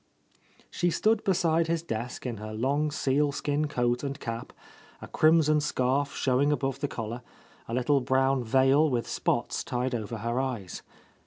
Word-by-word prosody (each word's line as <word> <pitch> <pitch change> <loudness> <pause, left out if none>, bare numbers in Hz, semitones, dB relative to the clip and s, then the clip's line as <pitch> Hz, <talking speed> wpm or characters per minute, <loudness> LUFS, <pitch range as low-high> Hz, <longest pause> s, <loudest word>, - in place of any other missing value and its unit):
She 175 - 0
stood 215 +5 +1
beside 170 -3 +2
his 165 0 -1
desk 120 -4 -5
in 120 -3 -3
her 110 +1 -7
long 140 +6 0
sealskin 145 +1 0
coat 120 -3 0
and 140 0 -4
cap, 115 -1 -5 0.5
a - - -9
crimson 155 -1 +4
scarf 140 0 0
showing 135 +3 +2
above 135 -3 -1
the - - -1
collar, 115 +1 -5 0.5
a 115 - -3
little 135 +3 +2
brown 130 0 +2
veil 135 +6 +4
with 120 -3 -1
spots - - -1
tied 125 +1 -2
over 115 -1 -3
her 115 +3 -2
eyes. 115 -9 -4
135 Hz, 155 wpm, -28 LUFS, 120-150 Hz, 0.5 s, crimson